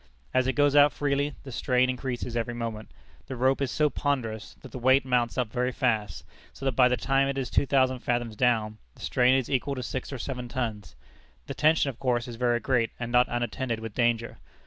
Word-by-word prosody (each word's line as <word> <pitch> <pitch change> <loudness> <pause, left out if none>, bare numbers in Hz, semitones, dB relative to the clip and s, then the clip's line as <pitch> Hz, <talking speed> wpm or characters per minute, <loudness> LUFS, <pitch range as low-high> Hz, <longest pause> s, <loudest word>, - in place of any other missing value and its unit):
As 130 0 +2
it 130 - +1
goes 145 0 +3
out 145 0 +7
freely, 145 0 -1
the 135 - -9
strain 125 +1 +2
increases 125 -2 -4
every 120 0 -2
moment. 115 -2 -5 0.4
The 130 - -5
rope 130 +3 +1
is 135 - 0
so 150 +3 +2
ponderous, 115 -7 -2
that - - -11
the 130 - -6
weight 130 +2 +4
mounts 125 -2 0
up 125 -4 -1
very 125 +1 0
fast, 110 -8 -1 0.3
so 135 - -9
that 135 - +2
by 125 +1 +5
the 125 0 +1
time 135 0 +1
it 140 0 -2
is 130 -2 -3
two 140 - +2
thousand 130 -2 +2
fathoms 120 -2 -2
down, 110 -2 +1 0.2
the - - -17
strain 125 +1 +3
is 130 -3 0
equal 140 +1 -1
to 130 - -5
six 130 +2 -5
or 135 - -4
seven 125 -1 -5
tons. 110 -6 -4 0.5
The - - -5
tension 155 -2 +3
of 120 - -21
course 120 -2 0
is 120 - -7
very 120 0 +1
great, 115 -1 +1
and 120 -1 -4
not 125 0 +4
unattended 120 0 -2
with 110 -1 -7
danger. 115 0 0
125 Hz, 220 wpm, -27 LUFS, 120-135 Hz, 0.5 s, out